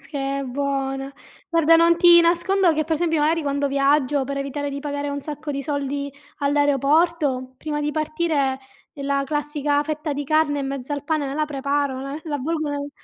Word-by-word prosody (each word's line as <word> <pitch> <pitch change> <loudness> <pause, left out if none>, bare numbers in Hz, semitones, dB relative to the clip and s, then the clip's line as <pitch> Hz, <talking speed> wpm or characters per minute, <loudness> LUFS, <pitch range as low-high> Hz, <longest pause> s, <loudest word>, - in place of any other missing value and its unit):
se 290 - -7 0.2
è - - -2
buona. 270 0 -2 0.4
Guarda 330 -1 +5
non 335 +1 +5
ti 345 0 +7
nascondo 345 +1 +3
che 310 0 0
per 320 +1 0
esempio 325 -1 0
magari 320 +2 +2
quando 280 0 0
viaggio 280 0 +2
per 280 +1 -4
evitare 280 +1 -3
di 280 - -4
pagare 285 0 -3
un 285 0 -3
sacco 295 +1 -6
di 275 -1 -3
soldi 280 -1 -3 0.3
all'aeroporto, 285 -1 +1
prima 295 +1 -3
di 295 0 -1
partireì 310 -3 0 0.4
la 275 0 0
classica 295 0 0
fetta 305 0 -3
di 290 +1 -3
carne 295 -1 +2
in 270 - -3
mezzo 275 +1 -5
al 285 - -3
pane 300 -1 -1
me 270 - -4
la 305 0 +1
preparo, 280 -2 -1
l 275 +3 -6
la 305 -2 -4
avvolgono 295 +1 -2
nel 285 0 -5
290 Hz, 190 wpm, -22 LUFS, 275-310 Hz, 0.4 s, ti